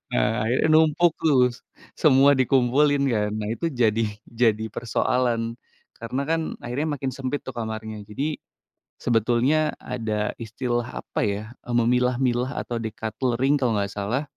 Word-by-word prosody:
Eee, 110 - +1
ya - - +5
numpuk 160 +2 +4
tuh, 130 -6 +4
s - - -13 0.4
semua 140 -2 +5
dikumpulin 135 +2 +3
kan. 105 -2 0
Nah 105 -1 -3
itu 165 +8 -2
jadi 115 -5 +1 0.2
jadi 110 -2 +1
persoalan. 115 0 0 0.4
Karena 120 +4 -3
kan 165 +2 0 0.2
akhirnya 145 +5 -2
makin 135 -1 -3
sempit 135 +2 -4
tuh 130 - -6
kamarnya. 110 -2 -5
Jadi 145 +8 -3 0.6
sebetulnya 120 +7 +2
ada 110 -4 -3
istilah, 120 +2 -3
apa - - -5
ya, 100 0 -1 0.2
memilah-milah 125 +1 +1
atau 120 - -4
deculttering 120 +5 -1
kalau 120 -6 +1
nggak 100 -1 -2
salah. 105 +8 -2
120 Hz, 135 wpm, -24 LUFS, 110-135 Hz, 0.6 s, ya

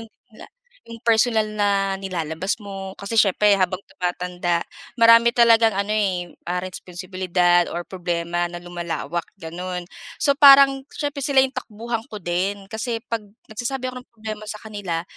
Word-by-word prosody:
yung 225 - -10 0.2
la 215 - -13 0.4
yung 230 0 -11
personal 225 -2 +2
na 195 -1 +1
nilalabas 185 +1 -3
mo, 195 -1 -7
kasi 200 +3 -3
siyempre 205 0 +4
habang 185 0 0
tumatanda, 180 -1 -2 0.3
marami 230 0 +6
talagang 230 -2 +5
ano, 200 +1 -2
eh, 190 -5 0 0.3
responsibilidad 180 -1 0
or 175 - -2
problema 175 -1 -2
na 175 0 -8
lumalawak, 170 -2 -4
gano'n. 180 0 -6 0.4
So, 280 -1 +3
parang 275 -1 +7
siyempre 285 -2 -3
sila 275 -2 +5
yung 265 - 0
takbuhan 230 -2 -5
ko 210 -7 -9
din. 195 +3 -2
Kasi 225 +1 -3
'pag 230 - -3 0.3
nagsasabi 250 +4 -3
ako - - -12
ng 250 - -15
problema 215 -1 -7
sa 210 0 -7
kanila, 200 -6 -4
200 Hz, 145 wpm, -22 LUFS, 180-230 Hz, 0.4 s, parang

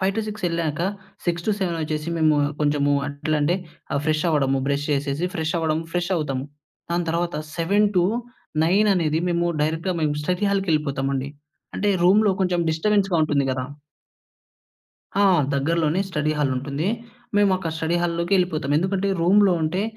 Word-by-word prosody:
5-6 210 +2 -2
ఎళ్ళాక 165 -2 -2 0.5
6-7 175 +1 -1
వచ్చేసి 155 +1 -3
మేము 155 -1 +4 0.3
కొంచెం 145 -1 +1 0.2
అట్లా 145 +2 -2
అంటే, 170 +5 +2 0.4
ఆహ్, 140 - +1
ఫ్రెష్ 155 +1 +1
అవ్వడము, 135 -3 +2
బ్రష్ 140 +1 0
చేసేసి, 145 +4 -1
ఫ్రెష్ 160 +1 -2
అవ్వడం, 160 -1 0
ఫ్రెష్ 175 +1 -1
అవుతాము. 135 -5 -2 0.5
దాని 170 -1 0
తరువాత 170 +1 -1 0.2
7-9 200 0 +1
అనేది 160 -3 +1
మేము 170 0 +1 0.2
డైరెక్ట్‌గా 165 +4 -1
మేము 150 -1 +1
స్టడీ 180 +6 -1
హాల్‌కెళ్ళిపోతాం 150 -8 0
అండి. 135 +1 -3 0.5
అంటే 205 - 0 0.2
రూమ్‌లో 205 +2 +5
కొంచెం 180 -1 +1
డిస్టర్బెన్స్‌గా 195 +3 +1
ఉంటుంది 145 -2 +1
గదా! 130 0 -3 1.5
ఆ! 200 - +4 0.3
దగ్గరలోనే 160 +4 +1
స్టడీ 155 -4 0
హాల్ 145 -2 +1
ఉంటుంది. 140 +6 -2 0.5
మేము 205 -1 +4
అక 180 -3 -4
స్టడీ 165 +1 0
హాల్‌లోకెళ్ళిపోతాం. 170 -3 0
ఎందుకంటే, 190 +3 0
రూమ్‌లో 195 +3 +5
ఉంటే, 180 +5 0
165 Hz, 135 wpm, -23 LUFS, 150-185 Hz, 1.5 s, రూమ్‌లో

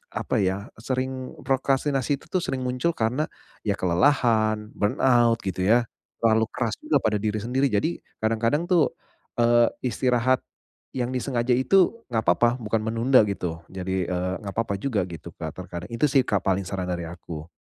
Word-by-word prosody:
apa - - -2
ya, 95 +2 -2
sering 130 +1 -3
prokrastinasi 135 0 +1
itu - - -19
tuh 185 - 0
sering 130 - -2
muncul 125 +6 0
karena 120 +7 0 0.4
ya 100 - +1
kelelahan, 110 +2 +2
burnout, 115 +2 +3
gitu 95 -1 -2
ya, 115 +4 +4 0.4
terlalu 110 -1 +4
keras 120 -3 -2
juga 150 - 0
pada 110 -3 +1
diri 105 0 -1
sendiri. 130 +5 +1
Jadi 135 +12 +1 0.2
kadang-kadang 115 +8 +1
tuh, 175 -5 +3 0.5
eee, 120 0 +5 0.2
istirahat 125 +1 +2 0.5
yang 125 -2 -2
disengaja 125 -1 0
itu, 185 - +3 0.2
nggak 110 -1 +1
apa-apa, 120 +7 +5
bukan 110 0 0
menunda 115 +4 +4
gitu. 90 -5 -3
Jadi, 95 0 -2
eee, 90 +1 -1
nggak 100 -3 -6
apa-apa 110 -1 -1
juga 120 -5 0
gitu, 85 -1 -8
Kak, 80 -2 -6
terkadang. 90 -1 -7
Itu 115 +5 0
sih, 135 -3 +4
Kak, 100 - +2
paling, 95 0 +1
saran 95 -2 -3
dari 90 -1 -2
aku. 85 -1 -8
115 Hz, 165 wpm, -25 LUFS, 95-130 Hz, 0.5 s, eee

